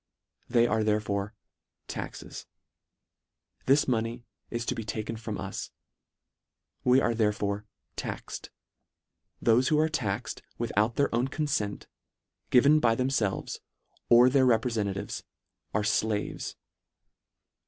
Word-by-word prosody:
They 120 -1 +4
are 110 -2 +1
therefore 105 0 0 0.5
taxes. - - -7 1.2
This 140 +3 +5
money 120 -1 -1 0.2
is 120 0 -3
to - - 0
be 115 - -4
taken 110 +1 -4
from 110 -2 -5
us. 95 0 -5 1.1
We 125 +1 +5
are 120 - +2
therefore 105 -2 0 0.3
taxed. - - -6 0.9
Thole 115 +1 +5
who 150 +4 +2
are 155 +1 +3
taxed 110 -10 -2 0.2
with - - -2
out 110 +3 +2
their 140 - +1
own 120 +3 +2
confent, 135 -9 -2 0.6
given 140 +5 +6
by 115 -5 +3
themfelves, 125 -6 -1 0.5
or 120 +1 +8
their 130 0 +4
reprefentatives, 110 -4 0 0.5
are 105 - 0
flaves. 105 0 -1
115 Hz, 110 wpm, -28 LUFS, 105-125 Hz, 1.2 s, or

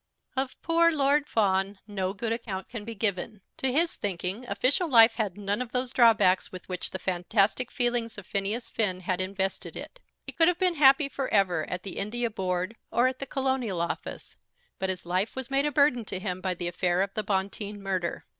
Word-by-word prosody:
Of 265 0 -2
poor 335 0 +4
Lord 290 -1 +2
Fawn 195 -2 +1
no 195 -3 -2
good 225 +3 -3
account 205 -5 -5
can 230 -3 -6
be 230 +1 -7
given. 205 0 -2 0.2
To 265 - 0
his 330 +5 +1
thinking, 195 +4 -3
official 285 +9 +1
life 230 -3 +7
had 205 -5 -1
none 205 +2 -1
of 245 -2 -6
those 250 0 -1
drawbacks 225 -7 +4
with 185 -1 -9
which 180 -1 -4
the - - -4
fantastic 195 +6 +1
feelings 240 -2 -1
of 205 - -9
Phineas 205 +5 -2
Finn 185 -5 -1
had 185 0 -1
invested 190 0 -3
it. - - -9 0.3
He - - -6
could 330 - +3
have 355 -1 +3
been 365 -1 +2
happy 280 -1 +6
for 275 -1 -3
ever 180 -6 +2
at 180 0 -4
the 195 - -6
India 235 +3 -2
Board 185 +1 -2
or 240 +2 +2
at 255 0 -3
the 275 - -5
Colonial 260 -8 -1
Office; 170 - -4 0.4
but 190 - -1
his 185 -2 -3
life 185 +4 -1
was 260 0 -6
made 275 +2 +2
a - - -1
burden 280 -4 +3
to 190 - -5
him 185 -1 -4
by 185 -1 -1
the 175 0 -4
affair 175 +1 +1
of 195 0 -5
the 215 - -1
Bonteen 200 +1 -2
murder. 190 -3 -3
210 Hz, 205 wpm, -28 LUFS, 190-255 Hz, 0.4 s, life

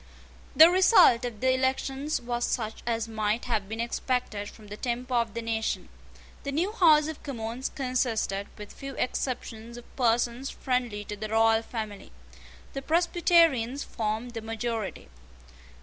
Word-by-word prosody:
The 320 - +10
result 360 - +6
of 225 -4 -6
the 260 0 +3
elections 265 +3 -1
was 240 0 -3
such 220 -3 -2
as 230 -1 0
might 220 0 -1
have 215 -5 -1
been 220 +1 -5
expected 235 -3 -2
from 215 - -15
the 205 0 -8
temper 250 +2 -3
of 235 -3 0
the 230 - -3
nation. 225 -1 -2 0.5
The 280 - -4
new 340 +8 0
House 315 -8 +5
of 315 -2 -6
Commons 235 -1 -4
consisted, 245 -7 -1
with 210 -1 -9
few 275 -1 -8
exceptions, 235 -2 -3
of 240 - -14
persons 240 +1 +1
friendly 245 -5 -2
to 210 - -5
the 215 +1 -6
royal 225 0 +4
family. 215 -3 -6 0.6
The 275 - -4
Presbyterians 330 -5 +3
formed 220 +2 -3
the 230 -1 -6
majority. 225 -1 -4
240 Hz, 150 wpm, -28 LUFS, 220-265 Hz, 0.6 s, The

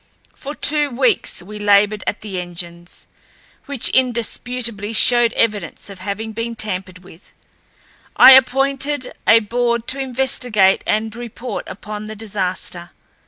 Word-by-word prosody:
For 290 +1 -8
two 295 -1 +2
weeks 325 - 0
we 210 +3 -10
labored 205 0 +3
at - - -2
the 195 -4 -4
engines, 175 0 -8 0.6
which 280 -4 0
indisputably 235 -3 -1
showed 240 0 +4
evidence 205 -4 -2
of 195 - -11
having 210 +3 -5
been 230 +1 -4
tampered 185 -3 -3
with. 180 0 -17 0.8
I - - +9
appointed 270 +1 +3
a 225 0 +6
board 235 +1 -1
to 275 - +2
investigate 250 -6 +1
and 215 +1 -1
report 240 +1 -7
upon 210 +2 -8
the 215 - -7
disaster. 185 -4 -4
220 Hz, 125 wpm, -19 LUFS, 200-250 Hz, 0.8 s, I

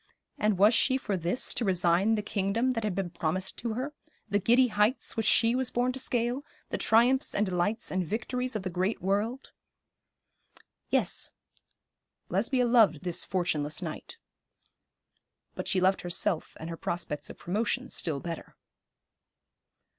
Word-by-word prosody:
And 210 -2 +2
was 205 +5 +6
she 260 +3 +3
for 210 -6 -2
this 180 +7 -1
to - - -1
resign 185 +2 +3
the 210 - -2
kingdom 205 +5 0
that 225 -3 -2
had 210 -4 -1
been 185 -3 -2
promised 175 +3 -2
to 230 -2 -2
her, 265 +5 -3 0.3
the 205 -1 +1
giddy 240 +5 +4
heights 210 +4 +1
which 225 -2 0
she 230 +2 +4
was 255 0 0
born 245 +1 +1
to 265 - -5
scale, 245 +1 -1 0.3
the - - -2
triumphs 245 +4 +3
and 210 - +2
delights 190 +4 -1
and 185 0 0
victories 250 +6 -3
of 210 - -2
the 185 - -3
great 185 +5 -1
world? 210 +7 -1 1.4
Yes, - - 0 1.0
Lesbia 255 -2 +1
loved 225 - +4
this 175 -2 0
fortuneless 155 -5 -1
knight; - - -7 1.4
but - - -5
she 190 - +1
loved 190 +1 +2
herself 175 -1 -1
and 160 - -6
her 165 - -6
prospects 170 -4 -3
of - - -10
promotion 230 +7 -1
still 155 -5 -1
better. 165 +2 -7
210 Hz, 155 wpm, -29 LUFS, 180-240 Hz, 1.4 s, was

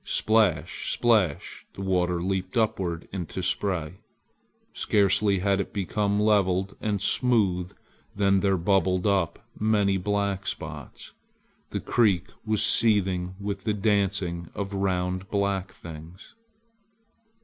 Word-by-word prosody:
Splash! 110 -7 +1
splash! 105 -11 +1
the 95 - -6
water 90 -2 0
leaped 95 +2 -2
upward 90 -7 -1
into 95 0 -4
spray. 90 -2 -1 0.7
Scarcely 100 0 +2
had 100 0 +2
it - - -7
become 100 +1 0
leveled 100 -3 +2
and 105 -2 -1
smooth 100 -5 +1 0.4
than 100 -1 +3
there 95 0 +2
bubbled 95 0 +1
up 95 -5 0
many 105 -2 +2
black 100 0 -1
spots. - - -7 0.6
The - - -3
creek 100 -7 +2
was 110 -1 +1
seething 95 -5 +1
with 100 -1 -4
the 105 - 0
dancing 100 -5 0
of 100 0 -4
round 95 -1 -1
black 100 -2 -1
things. 85 +2 -11
95 Hz, 115 wpm, -26 LUFS, 90-105 Hz, 0.7 s, than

